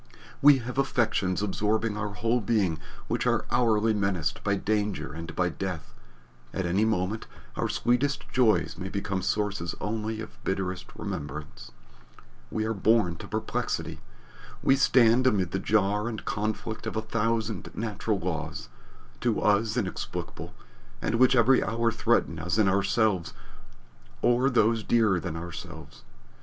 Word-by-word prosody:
We 145 -1 +8
have 125 +1 -4
affections 105 -8 +1
absorbing 105 +2 0
our 105 -1 -4
whole 115 +5 +1
being 95 -7 +1 0.3
which - - -1
are - - +1
hourly 115 -2 +3
menaced 100 -7 -1
by 100 -1 +2
danger 105 -6 -1
and 80 +1 -7
by 90 -1 +1
death 85 -8 -5 0.6
at 95 - -1
any 95 +5 +2
moment 105 0 -1 0.3
our - - -1
sweetest 130 +4 +1
joys 110 -9 +2
may 95 0 -4
become 100 -1 -2
sources 100 -3 -1
only 110 +1 -3
of 110 - -9
bitterest 95 -1 -2
remembrance. 75 -7 -6 0.8
We 110 - -1
are 110 - 0
born 105 -4 +2
to - - -9
perplexity. - - -3 0.6
We 135 - +5
stand 130 -2 +5
amid 95 -8 +2
the 95 - -1
jar 105 +1 +1
and 110 -2 -5
conflict 110 +1 -3
of - - -4
a 110 - -1
thousand 110 -1 -1
natural 110 -1 -1
laws, 80 -3 -4 0.5
to 120 -3 +1
us 110 +2 +2
inexplicable, 100 -6 -4 0.4
and - - -2
which 130 +1 +6
every 125 +2 +5
hour 115 0 +1
threaten 115 -7 +1
us 85 +4 -1
in 110 -3 +4
ourselves 100 -1 +1 0.9
or 125 +3 +4
those 115 -3 +2
dearer 110 -6 +3
than 85 -2 -5
ourselves. 85 -1 -8
105 Hz, 140 wpm, -27 LUFS, 95-115 Hz, 0.9 s, We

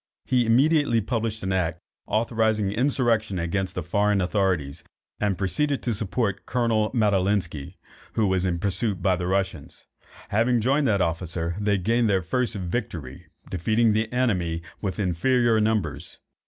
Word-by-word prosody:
He 125 -2 +2
immediately 140 0 +3
published 110 -1 -2
an 95 0 -1
act, 90 -2 -1 0.3
authorizing 110 -2 +1
insurrection 115 -4 +1
against 90 +3 -2
the 90 - -3
foreign 100 +4 +1
authorities, 90 -7 0 0.4
and 100 -3 0
proceeded 140 - 0
to 120 - 0
support 105 -1 -2
Colonel 115 -3 +1
Madalinski, 100 - 0 0.4
who 110 - +1
was 95 -1 +1
pursued 100 0 0
by 95 -2 +3
the 90 0 -3
Russians. 95 -6 -3 0.4
Having 115 +3 +2
joined 135 +5 +2
that 100 -3 +2
officer, 85 0 -2
they 105 -1 +1
gained 115 +4 +1
their 95 -2 +2
first 125 +5 -1
victory, 90 - -5 0.2
defeating 110 +5 +2
the 110 +1 0
enemy 90 -10 0 0.2
with 95 -3 -3
inferior 110 +5 +2
numbers. 85 -8 -1
105 Hz, 140 wpm, -25 LUFS, 90-115 Hz, 0.4 s, immediately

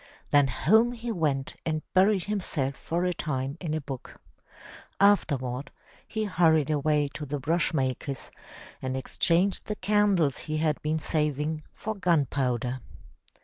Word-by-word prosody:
Then 145 -1 +5
home 220 - +3
he 235 0 -4
went 150 -8 -1
and 155 -1 -2
buried 190 0 +4
himself 165 -10 -1
for 170 +4 -2
a 180 - +1
time 135 -4 -3
in 160 -4 -2
a - - 0
book. 135 -2 -8 0.8
Afterward 140 -10 +2 0.4
he 220 -1 -2
hurried 160 -7 +3
away 150 0 +2
to 155 - -6
the 145 0 -3
brush 165 +5 +1
maker's 135 -1 -2 0.5
and 130 0 -2
exchanged 175 +8 +1
the 210 - -2
candles 195 -8 +2
he 155 0 -3
had 155 -1 0
been 155 +1 0
saving 150 0 -1
for 220 - -3
gun 175 -7 +2
powder. 125 -1 -1
155 Hz, 145 wpm, -27 LUFS, 140-185 Hz, 0.8 s, Then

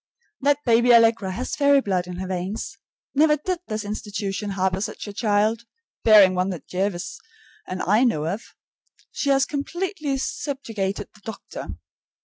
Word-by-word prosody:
That 285 +1 +2
baby 240 0 +5
Allegra 225 -4 +4
has 250 +6 -3
fairy 280 -1 +5
blood 185 -7 -1
in 180 - -6
her 185 +1 -4
veins. 185 +3 -4 0.4
Never 300 +1 +4
did 360 +4 -2
this 215 -2 -3
institution 205 -1 -4
harbor 190 0 +1
such 210 - -5
a 205 - -6
child, 215 +2 +1 0.4
barring 205 -4 +7
one 185 +1 0
that 180 -5 -6
Jervis 185 +5 -2 0.5
and 185 0 -4
I 210 +6 +3
know 155 -12 +1
of. 195 +7 -2 0.7
She 285 - -2
has 275 -1 +4
completely 305 0 -3
subjugated 225 -9 -3
the 210 - -20
doctor. 220 - -7
215 Hz, 150 wpm, -24 LUFS, 190-270 Hz, 0.7 s, barring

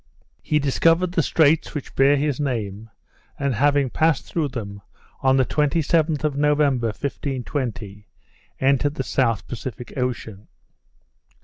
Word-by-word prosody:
He 150 - 0
discovered 165 +5 +2
the 175 - +2
straits 160 +1 +2
which 145 - -6
bear 135 +2 +4
his 145 -1 -1
name; 115 -6 -3 0.5
and 140 -1 -1
having 140 +2 +2
passed 160 -3 +1
through 160 -3 -1
them, 100 -6 -7 0.4
on 130 0 +3
the 130 - +3
27th 155 +1 +1
of 150 -2 0
November, 145 -4 +2
1520, 125 -4 -4 0.5
entered 140 +2 +2
the 135 - -2
South 115 -6 0
Pacific 125 -1 -7
Ocean. 115 -5 -4
135 Hz, 125 wpm, -22 LUFS, 120-150 Hz, 0.5 s, bear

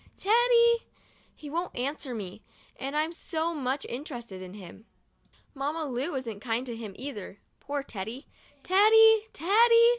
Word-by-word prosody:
Teddy! 470 +2 +4 0.5
He 300 - -11
won't 340 +3 -3
answer 265 0 -3
me 205 -1 -7 0.2
— - - -30
and 275 +2 -4
I'm 315 +2 0
so 330 0 -2
much 270 -2 -2
interested 240 - -7
in 185 +1 -9
him. 205 +2 -12 0.7
Mamma 295 +4 -2
Lu 275 +4 -2
isn't 230 -6 -4
kind 230 +3 -2
to 240 -2 -5
him 220 -3 -7
either 230 -8 -7
— - - -44
poor 285 0 -4
Teddy. 225 +4 -6 0.4
Teddy! 440 +3 +6
Teddy! 460 +7 +5
280 Hz, 150 wpm, -28 LUFS, 235-365 Hz, 0.7 s, Teddy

